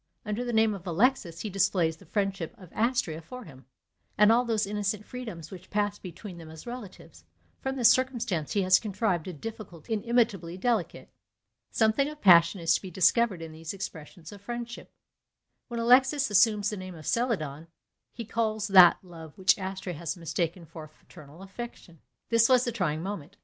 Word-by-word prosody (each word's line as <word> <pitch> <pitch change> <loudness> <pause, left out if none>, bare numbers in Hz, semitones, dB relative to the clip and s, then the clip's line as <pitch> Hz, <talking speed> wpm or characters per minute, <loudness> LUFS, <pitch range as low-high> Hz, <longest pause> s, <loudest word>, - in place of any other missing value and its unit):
Under 210 +3 -2
the 245 - -3
name 220 -1 +3
of 190 -2 -9
Alexis 175 -2 +1
he 215 - -4
displays 180 -4 +1
the - - -18
friendship 195 -5 -2
of 185 -4 -15
Astrea 220 -9 0
for 250 +10 -10
him, 135 - -15 0.5
and 210 +1 +6
all 240 +2 +4
those 220 -3 0
innocent 205 +1 -2
freedoms 220 -11 -8
which 185 -1 -11
passed 205 0 -1
between 180 0 -9
them 160 -1 -11
as 160 0 -11
relatives; 240 -5 -10 0.4
from 265 -1 -3
this 245 -4 +6
circumstance 240 - -1
he 200 - +1
has 185 0 +5
contrived 200 -5 -1
a 185 - -5
difficulty 195 +1 -7
inimitably 215 -6 0
delicate. 220 -2 -2 0.6
Something 225 +6 +2
of 300 0 -10
passion 175 - +6
is 165 0 +3
to - - 0
be 190 - -8
discovered 190 +1 +2
in 165 - -8
these 160 +3 -7
expressions 165 -3 -8
of 205 -1 -12
friendship. 240 +2 -7 0.8
When 235 -2 -5
Alexis 260 +2 +4
assumes 205 0 +4
the 210 - -5
name 185 -1 -8
of 155 -2 -12
Celadon, 165 - -1 0.4
he 235 - -7
calls 215 -1 -1
that 185 -3 +8
love 165 -4 -12
which 190 -1 +4
Astrea 190 -1 -5
had 165 +2 -5
mistaken 170 +1 -3
for 160 -1 -10
fraternal 155 +2 -15
affection. 195 -5 -9 0.3
This 230 +1 +4
was 250 -1 +5
the 240 - -1
trying 170 -8 -2
moment. 195 -1 -6
195 Hz, 175 wpm, -28 LUFS, 170-230 Hz, 0.8 s, that